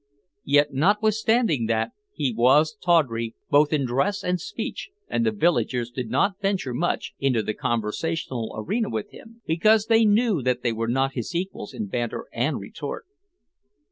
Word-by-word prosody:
Yet 145 Hz, +1 st, +3 dB
notwithstanding 210 Hz, -, +2 dB
that 110 Hz, 0 st, 0 dB, 0.2 s
he 135 Hz, -, -1 dB
was 140 Hz, +7 st, +4 dB
tawdry 120 Hz, -10 st, +2 dB, 0.2 s
both 145 Hz, +1 st, +5 dB
in 145 Hz, -4 st, +1 dB
dress 140 Hz, +12 st, 0 dB
and 180 Hz, -1 st, -1 dB
speech -, -, -5 dB, 0.2 s
the 230 Hz, -1 st, +1 dB
villagers 125 Hz, -, 0 dB
did 120 Hz, -2 st, -5 dB
not 190 Hz, -, +1 dB
venture 195 Hz, -10 st, -1 dB
much 175 Hz, +8 st, -1 dB
into 130 Hz, -5 st, +1 dB
the 110 Hz, -, -2 dB
conversational 120 Hz, +3 st, -2 dB
arena 215 Hz, -, -1 dB
with 210 Hz, -2 st, -4 dB
him 230 Hz, +1 st, -15 dB
because 210 Hz, +7 st, +3 dB
they 225 Hz, 0 st, +4 dB
knew 215 Hz, -, +3 dB
that 125 Hz, 0 st, 0 dB
they 120 Hz, -, +1 dB
were 115 Hz, +1 st, -2 dB
not 135 Hz, +3 st, +1 dB
his 130 Hz, +7 st, -5 dB
equals 185 Hz, +3 st, -4 dB
in 220 Hz, -, -4 dB
banter 120 Hz, -, -3 dB
and 125 Hz, +4 st, 0 dB
retort. 140 Hz, +9 st, -7 dB
150 Hz, 155 wpm, -24 LUFS, 120-205 Hz, 0.2 s, both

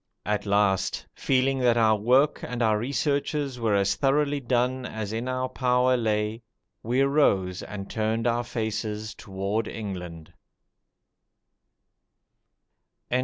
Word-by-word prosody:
At 105 Hz, 0 st, -1 dB
last, 100 Hz, -1 st, +1 dB
feeling 135 Hz, 0 st, +1 dB
that 120 Hz, -2 st, +3 dB
our 110 Hz, -1 st, +4 dB
work 125 Hz, +8 st, +3 dB
and 125 Hz, -1 st, -3 dB
our 110 Hz, -1 st, +3 dB
researches 140 Hz, +1 st, -1 dB
were 110 Hz, -3 st, +1 dB
as 100 Hz, 0 st, +2 dB
thoroughly 145 Hz, +3 st, +1 dB
done 125 Hz, 0 st, 0 dB
as 110 Hz, -3 st, -5 dB
in 115 Hz, +3 st, -3 dB
our 130 Hz, 0 st, -1 dB
power 125 Hz, 0 st, +2 dB
lay, 110 Hz, -1 st, -1 dB, 0.4 s
we 125 Hz, +4 st, +1 dB
arose 100 Hz, -11 st, +2 dB
and 100 Hz, -1 st, -7 dB
turned 110 Hz, +1 st, -1 dB
our 120 Hz, 0 st, +1 dB
faces 110 Hz, -2 st, -3 dB
toward 100 Hz, +2 st, -3 dB
England. 90 Hz, -7 st, -7 dB
115 Hz, 120 wpm, -26 LUFS, 105-130 Hz, 0.4 s, our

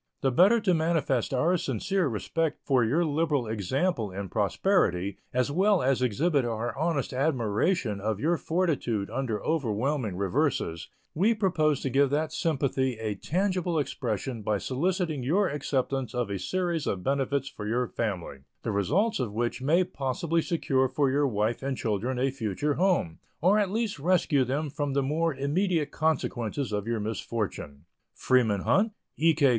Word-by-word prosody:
The 135 Hz, -, +2 dB
better 195 Hz, -, +5 dB
to 195 Hz, -3 st, +2 dB
manifest 160 Hz, -7 st, +1 dB
our 160 Hz, +8 st, +2 dB
sincere 190 Hz, 0 st, -1 dB
respect 150 Hz, +7 st, -1 dB
for 130 Hz, -4 st, +3 dB
your 150 Hz, +10 st, +2 dB
liberal 150 Hz, -4 st, 0 dB
example 110 Hz, -, -1 dB
in 95 Hz, +1 st, -6 dB
prosperity, 100 Hz, -, +1 dB
as 125 Hz, +3 st, 0 dB
well 190 Hz, +2 st, +3 dB
as 130 Hz, -1 st, +2 dB
exhibit 140 Hz, -, +2 dB
our 115 Hz, 0 st, -2 dB
honest 155 Hz, -3 st, -1 dB
admiration 130 Hz, -, 0 dB
of 105 Hz, -1 st, -1 dB
your 165 Hz, +7 st, +2 dB
fortitude 155 Hz, -, -1 dB
under 115 Hz, -6 st, -2 dB
overwhelming 130 Hz, -, -1 dB
reverses, 85 Hz, -3 st, -1 dB, 0.2 s
we 210 Hz, +8 st, +3 dB
propose 160 Hz, -8 st, +1 dB
to 135 Hz, -, -2 dB
give 140 Hz, +2 st, +3 dB
that 155 Hz, +2 st, -1 dB
sympathy 135 Hz, -6 st, 0 dB
a 110 Hz, -1 st, -2 dB
tangible 180 Hz, -, -1 dB
expression 125 Hz, -4 st, -2 dB
by 105 Hz, 0 st, 0 dB
soliciting 160 Hz, -, -1 dB
your 180 Hz, +11 st, +2 dB
acceptance 135 Hz, -2 st, -2 dB
of 120 Hz, -4 st, -1 dB
a 100 Hz, -, -2 dB
series 175 Hz, -, -1 dB
of 90 Hz, -2 st, -2 dB
benefits 135 Hz, 0 st, 0 dB
for 105 Hz, -6 st, -7 dB
your 120 Hz, +3 st, 0 dB
family, 95 Hz, -11 st, -3 dB, 0.2 s
the 115 Hz, -, -1 dB
result 185 Hz, -, +1 dB
of 120 Hz, -5 st, -2 dB
which 120 Hz, +4 st, -2 dB
may 165 Hz, +7 st, +3 dB
possibly 165 Hz, +2 st, -1 dB
secure 135 Hz, -6 st, +1 dB
for 135 Hz, +1 st, +1 dB
your 145 Hz, +1 st, +2 dB
wife 110 Hz, 0 st, -1 dB
and 135 Hz, -1 st, -2 dB
children 115 Hz, +4 st, -1 dB
a 130 Hz, +2 st, +1 dB
future 135 Hz, +4 st, -1 dB
home, 170 Hz, -, +1 dB, 0.2 s
or 190 Hz, +6 st, +4 dB
at 205 Hz, -3 st, +1 dB
least 215 Hz, -4 st, -2 dB
rescue 165 Hz, -3 st, +2 dB
them 140 Hz, +5 st, -1 dB
from 145 Hz, -2 st, -2 dB
the 140 Hz, 0 st, +1 dB
more 155 Hz, +2 st, 0 dB
immediate 155 Hz, +3 st, 0 dB
consequences 140 Hz, -5 st, -1 dB
of 105 Hz, +1 st, -2 dB
your 115 Hz, -1 st, -1 dB
misfortune. 105 Hz, -8 st, -4 dB, 0.3 s
Freeman 110 Hz, -6 st, +2 dB
Hunt, 200 Hz, -, +2 dB, 0.2 s
E. 165 Hz, 0 st, +3 dB
K. 140 Hz, -3 st, +4 dB
135 Hz, 160 wpm, -28 LUFS, 115-165 Hz, 0.3 s, better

